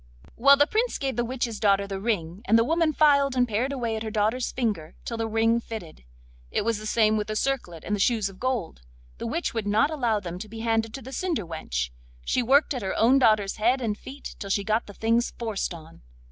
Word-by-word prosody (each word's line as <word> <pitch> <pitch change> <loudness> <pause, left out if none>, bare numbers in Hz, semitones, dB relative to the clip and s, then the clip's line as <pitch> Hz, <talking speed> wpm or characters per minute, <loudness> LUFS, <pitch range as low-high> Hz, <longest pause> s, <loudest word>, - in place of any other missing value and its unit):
Well, 275 +4 +7
then 290 - +6
the - - -24
Prince 465 +3 +1
gave 270 -3 -2
the 240 - 0
witch's 240 -2 -3
daughter 200 -2 +3
the 195 -1 -5
ring, 190 -4 -2
and 225 +3 +5
the 230 - +4
woman 325 +4 +2
filed 280 -3 +4
and 250 -1 +3
pared 235 +5 -1
away 235 -5 -2
at 220 - -4
her 220 - -3
daughter's 215 +4 0
finger 205 -11 -2
till 235 - -3
the 225 0 -1
ring 225 +1 +2
fitted. 210 - -9 0.4
It - - -1
was 230 -2 0
the 215 - -6
same 215 -1 +3
with 210 - -2
the 215 - -3
circlet 215 -11 -2
and 210 - -1
the - - -5
shoes 220 0 +2
of 190 -1 -11
gold. 245 - -2 0.4
The - - -4
witch 330 +9 -2
would 225 -3 -3
not 220 +9 +3
allow 240 -8 0
them 180 -2 -6
to 215 - -8
be 225 +1 -7
handed 225 -1 0
to 270 - -8
the 265 +3 -9
cinder 330 - -1
wench; 60 - -3 0.3
she - - +1
worked 275 +5 +3
at 250 - -4
her 190 - -2
own 255 +4 +5
daughter's 215 -5 +3
head 240 +5 +2
and 225 -4 -1
feet 270 +6 -9
till 200 - -6
she 200 +1 +1
got 220 +2 0
the 205 - -11
things 230 +2 +1
forced 220 -5 -2
on. 165 -1 -11
225 Hz, 245 wpm, -26 LUFS, 205-255 Hz, 0.4 s, Well